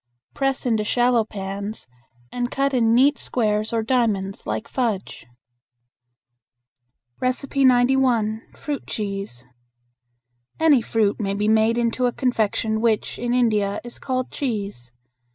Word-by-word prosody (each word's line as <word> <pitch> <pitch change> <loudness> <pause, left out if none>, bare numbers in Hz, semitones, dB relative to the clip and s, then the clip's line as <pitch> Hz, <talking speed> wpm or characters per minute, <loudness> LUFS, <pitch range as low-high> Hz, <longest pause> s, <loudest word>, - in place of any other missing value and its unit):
Press 270 -1 -1
into 225 -3 +1
shallow 240 +1 +2
pans 200 0 -6 0.5
and 245 0 -2
cut 275 +1 0
in 230 -2 +3
neat 280 +4 +4
squares 215 -2 -1
or 225 -1 0
diamonds 215 -5 0
like 225 - -3
fudge. 225 - -3 1.9
91. 255 -4 +2
Fruit 290 -3 -5
Cheese. 195 - -5 1.1
Any 310 -6 +5
fruit 220 -2 0
may 200 -2 -1
be 210 +1 0
made 220 +1 +3
into 240 +1 +1
a - - 0
confection 220 -3 0
which, 225 -2 0
in 240 0 -2
India, 215 -5 +1
is 240 0 -10
called 255 -1 -2
"cheese." 200 - -4
230 Hz, 115 wpm, -23 LUFS, 210-255 Hz, 1.9 s, Any